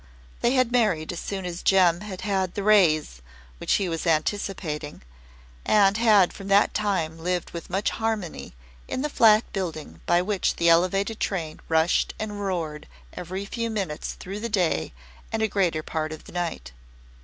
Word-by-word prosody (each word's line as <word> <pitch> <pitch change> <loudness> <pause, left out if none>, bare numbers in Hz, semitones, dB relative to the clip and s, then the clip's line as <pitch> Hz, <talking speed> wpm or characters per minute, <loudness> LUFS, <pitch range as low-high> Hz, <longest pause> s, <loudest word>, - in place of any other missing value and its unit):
They 240 - +2
had 255 -2 +2
married 210 -11 +1
as 175 - -5
soon 195 -2 -4
as 175 -1 -5
Jem 180 -3 +4
had 200 -3 -7
had 190 -3 -1
the 200 - -2
"raise" 160 - +3 0.5
he 195 - +2
was 165 0 -3
anticipating 155 - -2 0.6
and 205 -2 +4
had 215 -5 +4
from 195 - -9
that 200 +1 +4
time 175 -6 -1
lived 180 +1 -2
with 170 - -8
much 195 +3 0
harmony 220 - -3 0.3
in 260 - -3
the 300 - -2
flat 220 0 +6
building 155 - -5
by 175 +1 +3
which 200 0 0
the 170 0 +3
Elevated 195 +6 +2
train 165 -5 -3
rushed 160 +1 +2
and 210 -1 -4
roared 165 -6 -3 0.3
every 185 +3 -5
few 230 +3 -3
minutes 190 -9 -3
through 195 +3 -7
the 235 +2 -4
day 175 - 0 0.4
and 220 0 -1
a - - +3
greater 175 -7 0
part 155 -1 -3
of 155 - -8
the - - -13
night. 165 - -4
185 Hz, 165 wpm, -25 LUFS, 165-205 Hz, 0.6 s, flat